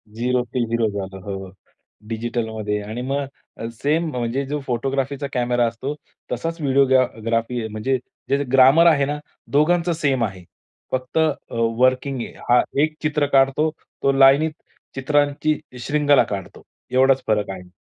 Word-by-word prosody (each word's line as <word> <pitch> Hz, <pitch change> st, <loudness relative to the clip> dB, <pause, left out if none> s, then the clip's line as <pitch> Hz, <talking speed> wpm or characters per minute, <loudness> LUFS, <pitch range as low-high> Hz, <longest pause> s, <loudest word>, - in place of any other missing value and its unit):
Zero 125 Hz, +1 st, 0 dB
ते 125 Hz, -2 st, +1 dB
hero 115 Hz, -1 st, +1 dB
झालो. 95 Hz, -2 st, -6 dB
हो, 100 Hz, -, -5 dB
हो, 95 Hz, -, -12 dB, 0.6 s
डिजिटलमध्ये 110 Hz, -2 st, -3 dB
आणि 110 Hz, +4 st, -6 dB
मग 140 Hz, +2 st, -2 dB, 0.3 s
अ, 115 Hz, -, -5 dB, 0.2 s
सेम 155 Hz, +4 st, +1 dB
म्हणजे 125 Hz, +2 st, -2 dB
जो 150 Hz, +1 st, -2 dB
फोटोग्राफीचा 135 Hz, +3 st, -2 dB
कॅमेरा 120 Hz, -1 st, +1 dB
असतो, 130 Hz, +5 st, -4 dB, 0.4 s
तसाच 165 Hz, 0 st, -3 dB
व्हिडिओग्रा 135 Hz, -2 st, +4 dB, 0.2 s
ग्राफी, 115 Hz, 0 st, -1 dB
म्हणजे 110 Hz, +5 st, -1 dB, 0.3 s
जे 140 Hz, +1 st, +2 dB
ग्रामर 135 Hz, +6 st, +6 dB
आहे 145 Hz, -4 st, +4 dB
ना, 145 Hz, +1 st, -2 dB, 0.3 s
दोघांचं 170 Hz, +4 st, +3 dB
सेम 140 Hz, -6 st, 0 dB
आहे. 95 Hz, -3 st, -7 dB, 0.5 s
फक्त 130 Hz, +4 st, -3 dB
अ, 160 Hz, -2 st, +3 dB, 0.5 s
वर्किंग 130 Hz, +1 st, +2 dB
आहे. -, -, -7 dB, 0.2 s
हा 120 Hz, -, +6 dB, 0.2 s
एक 155 Hz, 0 st, -1 dB
चित्र 150 Hz, -1 st, +1 dB
काढतो, 135 Hz, +4 st, +4 dB, 0.3 s
तो 140 Hz, -, +4 dB
लाईनीत 135 Hz, +3 st, +5 dB, 0.4 s
चित्रांची 145 Hz, +2 st, +1 dB, 0.3 s
शृंखला 145 Hz, -2 st, +4 dB
काढतो. 100 Hz, -2 st, -7 dB, 0.3 s
एवढाच 130 Hz, +1 st, +4 dB
फरक 105 Hz, -2 st, +1 dB
आहे. 90 Hz, -1 st, -9 dB
130 Hz, 145 wpm, -22 LUFS, 115-145 Hz, 0.6 s, ग्रामर